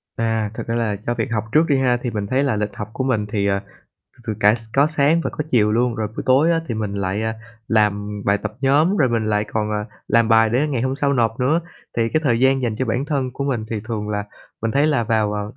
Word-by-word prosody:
À, 110 -2 -1
thật - - -5
ra 115 - -1
là 115 -3 0
cho 120 - 0
việc 115 +1 -2
học 105 -1 0
trước 155 +2 +4
đi 140 - +3
ha, 125 -2 +2
thì 120 - -2
mình 105 -2 -3
thấy 130 +5 +1
là 135 -5 +1
lịch 105 0 -1
học 105 0 -6
của 130 - -2
mình 115 -5 0
thì, 100 -2 0
à, 100 0 +1 0.6
từ - - -20
từ 110 - -1
cả 105 +2 +5
s 115 -1 -5
có 140 +2 +5
sáng 155 +1 +2
và - - -1
có 150 - -4
chiều 105 -5 +3
luôn. 120 +1 +1
Rồi 110 -2 -2
buổi 110 - -6
tối 135 +6 +4
á 165 -1 +2
thì 115 - -2
mình 105 -2 -3
lại, 100 +1 -2
à, 110 0 -1 0.3
làm 105 -1 0
bài 100 +1 +2
tập 110 +1 -5
nhóm 150 +8 +3
rồi 135 -9 +3
mình 115 -2 0
lại 105 0 +1
còn, 105 0 -2
à, 105 0 -2 0.2
làm 115 -1 +3
bài 110 0 +5
để 130 +6 +2
ngày 130 -5 -1
hôm 130 +1 -1
sau 140 -1 +1
nộp 115 -2 0
nữa, 150 +7 +2 0.4
thì 115 -1 +2
cái 155 - +1
thời 120 -3 +2
gian 130 0 +3
dành 115 -3 -1
cho 130 - -1
bản 125 +4 -1
thân 140 -4 -1
của 140 - -4
mình. 125 -6 -1
Thì 110 - -2
thường 110 -2 -4
là 105 -1 -2 0.4
mình 115 - 0
thấy 140 +4 +2
là 145 -7 +1
vào, 110 -2 +1
à, 105 0 -2
115 Hz, 280 wpm, -21 LUFS, 105-135 Hz, 0.6 s, cả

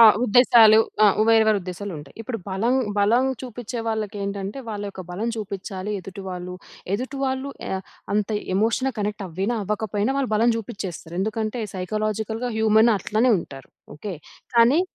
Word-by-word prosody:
ఆ! - - +11 0.2
ఉద్దేశాలు. 225 -2 +7 0.3
ఆ! - - +8 0.2
వేరు 225 -1 +6
వేరుద్దేశాలుంటాయి. 180 -6 -3
ఇప్పుడు 225 0 -4
బలం, 225 +7 +1 0.2
బలం 230 +6 +4 0.2
చూపిచ్చే 245 -1 -5
వాళ్ళకేంటంటే, 205 0 -3
వాళ్ళ 205 -1 -4
యొక్క 190 -1 -8
బలం 210 +6 -2
చూపిచ్చాలి 200 -1 -5
ఎదుటి 195 +2 -9
వాళ్ళు. 180 0 -5 0.4
ఎదుటి 260 +5 -4
వాళ్ళు 265 +1 -2 0.2
ఆహ్, 190 0 -2 0.3
అంత 210 0 +1 0.3
ఎమోషన్‌గా 230 +6 +1
కనెక్టవ్వినా, 205 +1 -2
అవ్వకపోయినా 210 +3 -1
వాళ్ళ 260 -5 -1
బలం 230 +2 +4
చూపిచ్చేస్తారు. 190 -6 -6
ఎందుకంటే, 220 +3 -2
సైకలాజికల్‌గా 215 +5 -2
హ్యూమనట్లనే 220 +1 +4
ఉంటారు. 135 -4 -11 0.3
ఓకే? 195 +4 -5 0.4
కానీ 245 +8 +6
215 Hz, 130 wpm, -23 LUFS, 195-230 Hz, 0.4 s, ఆ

